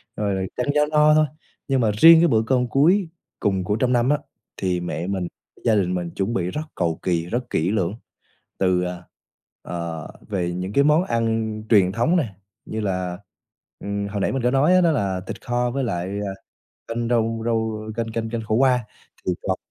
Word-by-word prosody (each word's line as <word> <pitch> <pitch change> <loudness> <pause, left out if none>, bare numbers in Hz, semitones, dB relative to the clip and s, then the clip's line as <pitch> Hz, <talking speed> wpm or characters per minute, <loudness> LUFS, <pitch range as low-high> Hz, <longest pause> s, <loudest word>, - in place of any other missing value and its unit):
rồi 95 -2 -1
ăn 125 - -2
cho 150 0 +4
no 150 0 +4
thôi. 155 0 +5 0.4
Nhưng 135 -1 +2
mà 110 -2 +3
riêng 165 +7 +9
cái 170 - +5
bữa 110 -6 +3
cơm 125 -1 +2
cuối 170 +8 +3 0.3
cùng 95 -2 0
của 105 +3 0
trong 125 +3 +1
năm 120 +1 +2
á, 150 - +4 0.4
thì 90 -2 0
mẹ 85 0 -4
mình, 95 -2 -2 0.4
gia 115 -2 +4
đình 90 -3 +1
mình 90 -2 -2
chuẩn 100 +4 -2
bị 90 -4 -1
rất 150 - -3
cầu 85 -3 -1
kỳ, 85 -2 0
rất 120 +7 -3
kỹ 85 +4 0
lưỡng 95 -4 0 0.6
từ, 90 -1 +2
ờ, 90 0 -5 0.6
ờ, 85 -3 -5 0.2
về 90 -4 -1
những 90 +3 -4
cái 140 - +4
món 150 +4 +4
ăn 115 - -1
truyền 95 -5 +5
thống 120 - +1
nè, 115 - -2 0.3
như 110 - -4
là, 90 -3 -2 0.6
ừm, 100 0 -3
hồi 100 0 -3
nãy - - +1
mình 135 - -1
có 125 - +3
nói 145 +7 +4
á, 185 - +5
đó 170 -2 +4
là 100 -10 -1
thịt - - -6
kho 120 0 0
với 135 - -1
lại, 90 -7 -2
ờ, 105 - -3 0.6
canh 115 0 -2
rau 115 -1 +1
rau 110 -2 -1 0.2
canh 115 -1 -1
canh 115 0 -3
canh 115 -1 -3
khổ 110 0 -1
qua, 125 0 +3 0.4
thì 90 - +2
còn 95 -1 0
110 Hz, 205 wpm, -23 LUFS, 95-125 Hz, 0.6 s, riêng